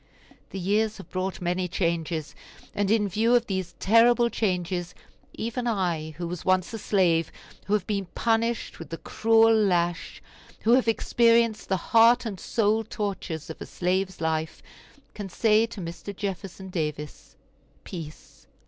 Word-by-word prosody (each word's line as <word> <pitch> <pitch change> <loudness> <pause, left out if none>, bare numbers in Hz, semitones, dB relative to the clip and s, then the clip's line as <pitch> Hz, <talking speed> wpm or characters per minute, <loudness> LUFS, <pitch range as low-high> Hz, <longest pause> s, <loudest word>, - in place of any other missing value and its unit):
The - - -7
years 210 +4 0
have 195 - -12
brought 185 0 -3
many 180 +1 -1
changes; 165 -3 -2 0.4
and 200 -1 0
in 215 -1 +3
view 225 +5 +2
of 240 -1 +3
these 190 -4 -4
terrible 235 +3 +4
changes 180 -3 -2 0.4
even 235 +2 -3
I, 170 -8 -1
who 175 -1 -4
was 175 0 -6
once 185 +2 +1
a 225 - -4
slave, 175 -6 +2 0.4
who 205 - 0
have 205 -3 +1
been 200 -3 -2
punished 230 0 0
with 165 -3 -9
the 165 - -5
cruel 225 +3 +3
lash, 175 -5 0 0.4
who 225 - +2
have 255 -1 +4
experienced 230 0 +2
the 190 - +2
heart 230 +6 +4
and 200 -5 -5
soul 220 0 +1
tortures 190 -8 -4
of - - -11
a - - -6
slave's 185 +1 -1
life, 160 -1 -2 0.5
can 205 -2 -6
say 220 +3 +3
to 230 -2 -9
Mr. 175 +3 -7
Jefferson 195 -1 -5
Davis, 150 -4 -5 0.5
"Peace! 160 -4 -10
195 Hz, 150 wpm, -26 LUFS, 175-225 Hz, 0.5 s, terrible